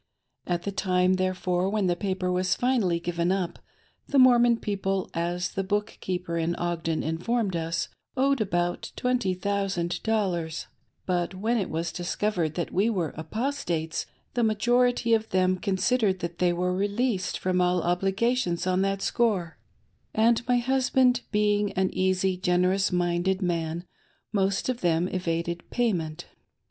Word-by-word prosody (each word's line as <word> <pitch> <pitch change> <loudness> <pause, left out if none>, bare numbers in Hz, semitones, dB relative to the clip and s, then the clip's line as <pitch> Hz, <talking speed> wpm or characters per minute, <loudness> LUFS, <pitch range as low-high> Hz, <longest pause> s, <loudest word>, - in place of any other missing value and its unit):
At 175 -1 -1
the 200 - -2
time, 185 -2 +2
therefore 185 0 0
when 210 -1 0
the 175 -1 +2
paper 185 -1 -2
wa:s 185 0 +1
finally 230 -9 +1
given 170 +1 -1
up, 190 -3 -2 0.5
the 285 - 0
Mormon 240 -2 +6
people, 195 -3 -2
as 175 +2 -1
the 195 - -2
book 205 +3 -2
keeper 180 -2 -2
in 165 +1 0
Ogden 165 -2 -2
informed 190 +6 -1
me, 165 -1 -2 0.5
owed 275 -1 +2
about 175 -3 -1
twenty 250 -7 0
thousand 185 -2 -1
dollars; 180 -8 -1 0.4
but 175 0 -1
when 220 +6 0
it 200 - -1
was 165 +1 -2
discovered 175 -3 -1
that 170 - -3
we 200 +5 +3
were 180 -9 -1
"Apostates," 165 - -2 0.3
the 240 - 0
majority 240 +2 +2
of 220 0 +1
them 185 0 +2
considered 200 +1 +1
that 170 0 -5
they 180 -1 +3
were 180 +1 0
released 205 +1 0
from 185 0 0
all 180 -1 +2
obligations 195 +2 0
on 185 0 +1
that 195 0 0
score, 200 -8 0 0.6
and 230 +2 +4
my 245 0 +3
husband 255 0 +2
being 210 -1 +2
an 190 0 +1
easy, 185 0 +1
generous 185 +2 +2
minded 175 +1 +1
man, 170 -1 -2 0.5
most 195 -1 +1
of 255 -1 -2
them 170 0 +2
evaded 170 -1 -2
payment. 175 -11 -1
185 Hz, 145 wpm, -27 LUFS, 175-215 Hz, 0.6 s, Mormon